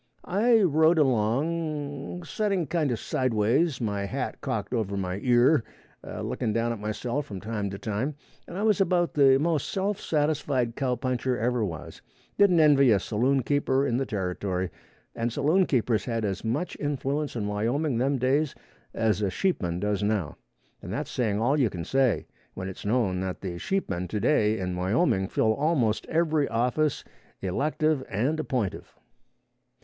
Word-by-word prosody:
I 220 +4 +3
rode 160 0 +4
along, 145 +5 0
setting 195 +2 -1
kind 155 0 0
of 120 - 0
side 130 +1 -1
ways, 125 +8 +2
my 100 -4 -2
hat 100 - -4
cocked - - -3
over 105 -4 -1
my 95 0 -2
ear, 125 +2 +4 0.4
a - - -6
looking 110 - -2
down 115 +1 0
at 115 - -4
myself 120 +6 -3
from 100 -2 -6
time 105 -1 -3
to 100 - -6
time, 110 +8 -3 0.3
and 175 - -7
I 205 - -1
was 215 -3 +3
about 175 -2 +2
the 135 -2 +6
most 155 0 0
self 195 +1 -1
satisfied 145 -6 0
cowpuncher 130 -1 -1
ever 120 0 0
was, 85 -7 -6 0.3
didn't 195 -4 +5
envy 145 -4 +6
a 105 -3 +5
saloon 125 +7 +1
keeper 140 0 +1
in 120 -3 0
the 135 0 -1
territory, 95 -2 -2 0.4
and 115 0 -2
saloon 155 +9 +2
keepers 115 -4 +1
had 115 -3 -1
as 95 -2 -3
much 125 +11 -2
influence 145 0 -2
in 110 -3 -2
Wyoming 115 +6 0
them 135 +2 +1
days 135 +4 +1 0.4
as 110 -3 +1
a 100 - +1
sheepman 90 - -1
does 105 0 -1
now, 105 -7 -1 0.5
and - - -7
that's - - -3
saying 105 -4 0
all 135 +7 +2
you 125 -5 +3
can 85 -4 -6
say, 135 -2 +1 0.3
when 95 0 -5
it's 95 +1 -7
known 105 -5 +1
that 95 -1 -4
the 90 -3 -5
sheepmen 150 - -2
to 105 +4 -3
day 110 -3 +2
in 90 -2 -3
Wyoming 95 - +1
fill 110 +2 +2
almost 135 -6 +1
every 160 -3 +1
office, 125 +6 0 0.4
elective 150 - 0
and 130 +11 0
appointive. 125 -9 -3
125 Hz, 165 wpm, -27 LUFS, 105-150 Hz, 0.5 s, the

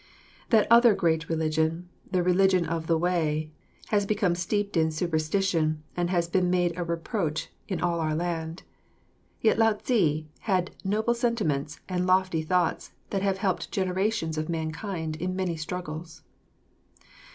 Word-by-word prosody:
That 220 -3 +5
other 235 -2 +7
great 160 -2 0
religion, 160 +1 0 0.2
the 180 -2 +2
religion 185 0 +3
of 165 0 -3
the 165 - +3
Way, 160 -3 0 0.4
has 205 -2 +2
become 205 -4 +2
steeped 200 +4 -1
in 160 -1 +3
superstition 155 0 0
and 175 0 0
has 175 -2 +1
been 180 +1 +1
made 175 -1 +1
a 175 - -2
reproach 170 -1 -2 0.2
in 190 - -3
all 170 -1 +1
our 155 -1 0
land. 165 0 -3 0.8
Yet 220 0 +3
Lao 225 -1 +5
Tze 175 - +1
had 185 -4 0
noble 215 +4 +1
sentiments 200 - -1
and 180 -1 -1
lofty 185 -3 +2
thoughts 175 +2 0 0.2
that 195 - 0
have 195 -1 +1
helped 190 -2 -1
generations 185 -3 0
of 155 - -3
mankind 160 0 -3
in 185 +3 -2
many 185 -3 -1
struggles. 160 0 -6
175 Hz, 145 wpm, -27 LUFS, 160-195 Hz, 0.8 s, other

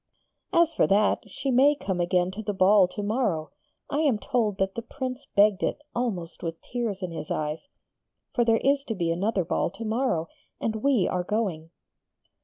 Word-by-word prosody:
'As 335 -1 +4
for - - +3
that, 210 +2 +2
she 270 +7 -3
may 275 +4 +5
come 190 -10 -3
again 180 +1 +1
to 205 +3 -6
the 205 -2 -3
ball 190 0 +5
to 205 +3 -6
morrow. 205 -8 -1 0.4
I 290 - -1
am 285 -8 +3
told 215 -3 0
that 195 0 0
the 230 - -4
Prince 255 +2 -6
begged 200 -2 +5
it, - - -1
almost 200 -9 -3
with 165 -1 -4
tears 225 -6 -4
in 180 - -3
his 160 -2 -6
eyes.... 155 - -3 0.7
For 240 - +3
there 225 -1 +4
is 275 +3 +2
to 225 - -3
be 170 -3 0
another 190 +2 0
ball 180 - 0
to 195 +6 -8
morrow, 220 -8 0 0.3
and 220 -1 -1
we 245 -4 +2
are 180 - 0
going!' 180 -6 -2
210 Hz, 190 wpm, -26 LUFS, 180-245 Hz, 0.7 s, may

